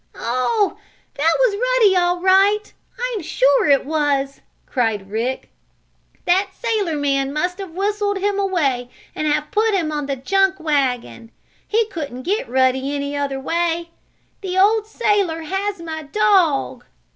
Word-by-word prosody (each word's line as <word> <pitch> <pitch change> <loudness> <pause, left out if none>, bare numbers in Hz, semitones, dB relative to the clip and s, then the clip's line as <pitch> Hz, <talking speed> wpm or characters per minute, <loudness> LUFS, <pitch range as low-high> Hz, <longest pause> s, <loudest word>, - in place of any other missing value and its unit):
"Oh, 255 - 0 0.3
that 315 +3 +2
was - - +3
Ruddy 485 -3 +3
all 355 0 +2
right! 390 +3 +3 0.4
I'm 425 - -3
sure 280 -2 +2
it 275 -1 +4
was!" 285 -2 -1 0.2
cried 220 -6 -2
Rick. 235 +5 -3 0.7
"That 380 +3 +2
sailor 430 -9 -1
man 275 -1 0
must 360 +6 -2
have 375 -4 -8
whistled 405 +1 -1
him 400 +1 -1
away 285 -11 0 0.2
and 310 - -2
have 300 0 0
put 430 0 +2
him 325 -5 -1
on 295 -2 -3
the 275 - -1
junk 385 +8 +1
wagon. 260 -6 -1 0.4
He 450 +1 +2
couldn't 290 - -6
get 415 - -1
Ruddy 260 +2 +1
any 280 0 -3
other 280 -1 -2
way. 335 +3 -1 0.5
The 375 -2 -3
old 425 +2 +3
sailor 400 -7 0
has 385 +4 -3
my 320 -1 -6
dog!" 310 -6 +1
330 Hz, 145 wpm, -20 LUFS, 275-400 Hz, 0.7 s, it